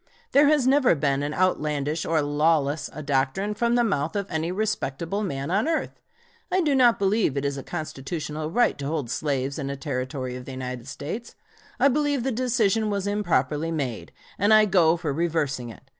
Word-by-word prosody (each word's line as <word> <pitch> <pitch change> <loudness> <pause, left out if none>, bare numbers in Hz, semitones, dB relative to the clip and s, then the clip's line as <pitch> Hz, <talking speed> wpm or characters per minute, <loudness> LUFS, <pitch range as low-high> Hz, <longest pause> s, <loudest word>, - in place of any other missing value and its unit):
There 285 +1 +6
has 295 -3 +3
never 265 -6 +4
been 140 -2 0
as 145 +1 -2
outlandish 150 -4 0
or 160 -2 +2
lawless 145 0 +1
a 155 - -7
doctrine 140 +9 0
from 235 +2 +1
the 240 - +3
mouth 160 -7 -1
of 200 -1 -1
any 160 +1 -1
respectable 195 -3 -2
man 140 -6 -3
on 200 +9 +1
earth. 325 -1 -2 0.5
I 370 - +2
do 300 -4 +2
not 245 -3 +5
believe 200 -7 +1
it 140 - -1
is 140 0 -1
a 135 - -5
constitutional 155 0 -5
right 240 0 +2
to 140 - -3
hold 145 -6 -2
slaves 140 +1 -2
in 140 -2 -3
a 140 - -3
Territory 130 -2 -4
of 125 0 -8
the 135 - -7
United 125 -1 -6
States. 165 +12 -6 0.4
I - - +6
believe 285 -1 +1
the 265 - 0
decision 225 -3 +1
was 200 -1 -1
improperly 175 -6 0
made, 135 -9 -3 0.3
and 205 +2 +3
I 215 0 +7
go 175 -4 +4
for 160 -4 -2
reversing 150 -6 -1
it. 115 - -12
160 Hz, 190 wpm, -25 LUFS, 140-215 Hz, 0.5 s, I